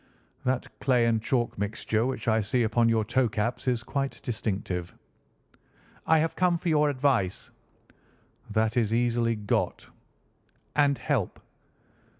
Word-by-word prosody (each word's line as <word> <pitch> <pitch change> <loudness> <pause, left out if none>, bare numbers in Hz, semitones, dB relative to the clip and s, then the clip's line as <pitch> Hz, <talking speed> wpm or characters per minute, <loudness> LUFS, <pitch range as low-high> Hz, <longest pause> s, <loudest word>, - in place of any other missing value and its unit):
"That 125 0 0
clay 125 -3 +3
and 115 -1 +2
chalk 120 -3 -1
mixture 110 +2 -1
which 125 -3 -4
I 110 0 +3
see 115 +4 +1
upon 115 +1 +2
your 115 -1 +2
toe 120 +2 +1
caps 115 +5 -2
is 120 -2 +1
quite 135 +2 -3
distinctive." 95 -6 -3 1.1
"I 160 - +5
have 160 +1 0
come 180 -2 +2
for 155 -3 +2
advice." 130 -9 0 1.0
"That 110 +1 +1
is 110 -3 +2
easily 120 -1 +1
got." 105 -1 -1 0.9
"And 145 -2 +3
help." 130 - -1
120 Hz, 130 wpm, -27 LUFS, 110-130 Hz, 1.1 s, I